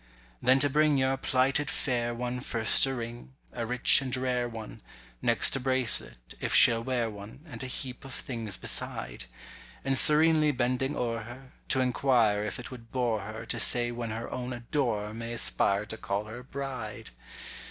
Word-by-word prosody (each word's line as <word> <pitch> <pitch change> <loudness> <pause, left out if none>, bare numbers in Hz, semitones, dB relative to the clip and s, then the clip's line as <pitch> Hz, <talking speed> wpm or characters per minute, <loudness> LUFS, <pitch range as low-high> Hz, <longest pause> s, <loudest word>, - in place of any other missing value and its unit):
Then 130 +1 +4
to 145 +1 +4
bring 150 +1 +2
your 130 0 +1
plighted 135 +2 +1
fair 120 -3 -1
one 125 +1 -4
first 115 +1 +3
a 135 - -2
ring—a 120 0 -8
rich 125 +3 +6
and 130 -1 -3
rare 125 -1 -1
one— 110 -2 -9 0.4
Next - - +3
a - - -1
bracelet, 125 - +1
if - - -1
she'll 115 0 +6
wear 125 -2 -1
one, 105 +4 -10
and 155 - -10
a 130 - -4
heap 125 0 -5
of 135 - -10
things 115 -8 -3
beside; - - -3 0.6
And 135 0 +1
serenely 155 +2 +5
bending 130 +3 -1
o'er 115 -3 -2
her, 120 +4 -11 0.2
to 130 - +2
inquire 120 -5 +2
if 105 - -4
it 125 - -9
would 115 -3 -12
bore 120 -4 0
her 110 +3 -8
To 120 0 -4
say 120 +2 +3
when 120 -1 -5
her 115 +2 -5
own 125 0 -5
adorer 120 -4 -2
may 115 +1 -6
aspire 100 -3 +1
to 110 +1 -7
call 100 0 -3
her 110 +3 -9
bride! 130 - -7
120 Hz, 175 wpm, -28 LUFS, 115-130 Hz, 0.6 s, rich